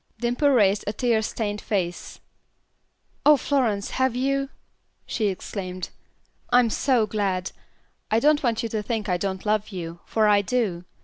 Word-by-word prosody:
Dimple 245 +4 +2
raised 210 -6 +3
a 205 - -1
tear 235 -3 +1
stained 210 -1 -3
face. 180 -5 -3 1.0
"Oh, 300 0 +7
Florence, 240 -8 0
have 260 -2 +1
you?" 275 +2 0 0.6
she 215 -3 -1
exclaimed. 185 -1 -5 0.6
"I'm 245 -2 +4
so 250 -3 +2
glad. 195 -4 -1 0.6
I 220 - +3
don't 295 +3 +4
want 235 -3 0
you 230 - -2
to 215 -1 -2
think 215 0 -3
I 180 -2 +1
don't 190 +1 -3
love 210 0 +1
you, 170 -4 -6
for 220 -1 +2
I 205 -1 +5
do. 200 -5 -1
215 Hz, 150 wpm, -24 LUFS, 195-245 Hz, 1.0 s, Oh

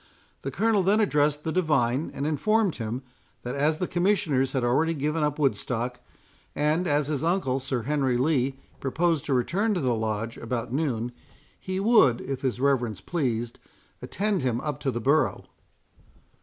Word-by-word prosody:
The 135 - -3
Colonel 210 - +2
then 200 +4 +3
addressed 150 -7 +2
the 160 - -2
divine, 150 -6 +1
and 140 - -2
informed 200 +6 +1
him, 115 +3 -4 0.4
that 125 - -4
as 150 +3 +1
the 180 - -2
Commissioners 175 -8 +1
had 130 -3 0
already 155 +7 +2
given 150 +2 -1
up 150 -1 0
Woodstock, 125 -4 -1 0.6
and 155 +5 +1
as 145 -1 +2
his 150 -1 -2
uncle, 165 -7 +1
Sir 130 -3 -3
Henry 135 -2 +1
Lee, 135 -1 +1 0.2
proposed 160 +3 0
to 140 - 0
return 200 - +1
to - - 0
the 130 -5 +1
Lodge 110 0 -2
about 115 0 -4
noon, 125 -5 -1 0.5
he 185 0 -3
would, 195 - +5
if 135 -1 -5
his 125 -3 -1
reverence 125 -7 +1
pleased, 120 - -2 0.4
attend 200 -1 -1
him 125 -2 0
up 150 -1 -3
to 140 -2 -1
the 120 -2 -2
borough. 140 +6 +2
140 Hz, 165 wpm, -26 LUFS, 125-165 Hz, 0.6 s, would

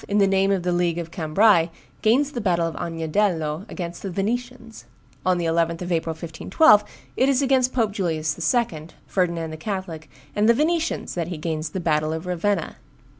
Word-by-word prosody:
in 205 - 0
the 200 - +5
name 195 0 +2
of 190 -3 0
the 180 - 0
League 175 -1 +1
of 165 -1 -5
Cambrai, 170 +1 +3 0.3
gains 270 +7 +3
the 240 - -4
battle 175 -4 +1
of 165 - -3
Agnadello 165 +1 -1
against 170 -2 -6
the 195 - -4
Venetians. 230 +4 -4 0.4
On 185 -1 +2
the 175 - -2
11th 165 +1 0
of 180 - -5
April, 165 -1 0
1512, 205 - +3 0.3
it 260 - +3
is 275 0 +2
against 260 -1 +3
Pope 230 -5 +1
Julius 160 -6 -1 0.2
II., 165 -10 -1 0.2
Ferdinand 170 -4 -1
the 155 - -7
Catholic, 170 -4 -5 0.3
and 210 +2 +3
the 235 - +6
Venetians 325 +3 0
that 170 -2 -2
he 175 -2 -5
gains 155 0 -3
the 190 - -4
battle 155 -2 0
of 160 +2 -5
Ravenna. 180 0 -1
180 Hz, 185 wpm, -23 LUFS, 165-210 Hz, 0.4 s, the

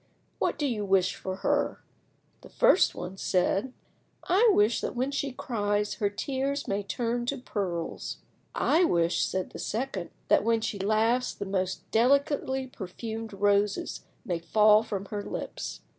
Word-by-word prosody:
What - - 0
do 295 - -1
you 230 -6 -1
wish 190 -2 +2
for 190 0 -5
her?" - - +1 0.6
The - - -13
first - - +4
one 180 +2 -6
said— 195 +7 +1 0.5
"I 420 +6 +4
wish 215 - +3
that - - -3
when 260 +3 0
she 280 -1 -2
cries 210 -4 -1
her 205 - 0
tears 275 +6 -2
may 200 +1 0
turn 240 +3 -2
to 280 - -1
pearls." 190 -9 -4 0.4
"I 335 +4 +3
wish," 170 - +2
said 185 -1 -2
the - - -9
second, 220 -6 -3 0.2
"that - - +4
when 230 0 +2
she 220 -2 -3
laughs 220 +5 +1
the 200 - -5
most 190 -1 -2
delicately 265 +2 +2
perfumed 225 0 -6
roses 205 0 +1 0.2
may 175 -6 -1
fall 210 +5 +5
from 200 -3 -4
her 205 -1 -2
lips." - - -5
215 Hz, 155 wpm, -28 LUFS, 195-250 Hz, 0.6 s, fall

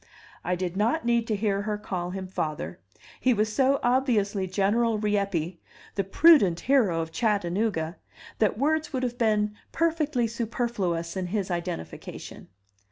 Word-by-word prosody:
I 180 +2 0
did 180 0 -3
not 230 +10 +1
need 235 -1 +2
to 215 - 0
hear 200 -1 0
her 210 0 -2
call 180 -4 -4
him 190 +1 -5
father; 150 - -4 0.4
he 255 -2 +3
was 215 0 0
so 270 +3 +3
obviously 220 -6 +1
General 215 +4 +1
Rieppe, 200 -5 -1 0.3
the 195 - 0
prudent 195 - +5
hero 220 -12 +3
of 160 0 -5
Chattanooga, 195 -3 0 0.4
that 215 -1 +2
words 310 +4 +1
would 260 -1 -1
have 245 0 -3
been 210 -2 +2 0.2
perfectly 310 -6 +1
superfluous 220 -7 -2
in 185 -1 -2
his 195 0 -2
identification. 170 - -6
210 Hz, 145 wpm, -27 LUFS, 180-235 Hz, 0.4 s, prudent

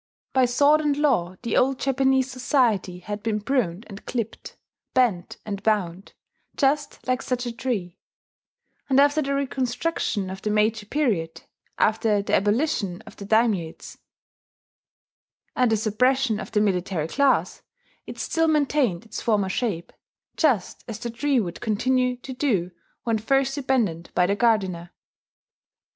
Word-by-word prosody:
By 260 -1 +4
sword 285 +5 +4
and 295 -2 +1
law 230 - +1
the 235 - -1
old 265 +1 +3
Japanese 265 -1 +1
society 240 -8 +1
had 205 +2 -5
been 215 -1 -1
pruned 210 -5 -1
and 200 -1 -10
clipped, 230 -3 -5 0.4
bent 225 -9 +1
and 200 -2 -4
bound, 195 -3 -1 0.4
just 280 -1 0
like 255 0 +1
such 250 -1 -2
a 240 - -3
tree; 230 -7 -4 0.9
and 265 0 +4
after 290 +2 +4
the 280 -1 -1
reconstructions 255 - -2
of 190 0 -7
the 215 - -2
Meiji 210 0 +1
period, 210 - -1 0.3
after 215 -1 +2
the - - -4
abolition 205 - +1
of - - -13
the 200 - -8
daimiates, 210 -6 0 1.6
and 250 -2 +3
the 220 - +3
suppression 230 +2 +1
of - - -7
the 210 - +2
military 180 -5 0
class, 275 - +1 0.5
it - - -8
still 325 0 0
maintained 285 - +1
its 220 - -6
former 205 -5 +1
shape, 190 -5 -2 0.4
just 255 - +1
as 225 -4 -5
the 235 - -5
tree 270 +3 +1
would 180 -5 -4
continue 250 +3 +1
to 260 +1 -8
do 210 -10 0 0.3
when 225 -2 0
first 270 +4 +1
abandoned 235 - -1
by 180 - +4
the 200 +2 +1
gardener. 190 -7 +1
230 Hz, 145 wpm, -24 LUFS, 200-265 Hz, 1.6 s, By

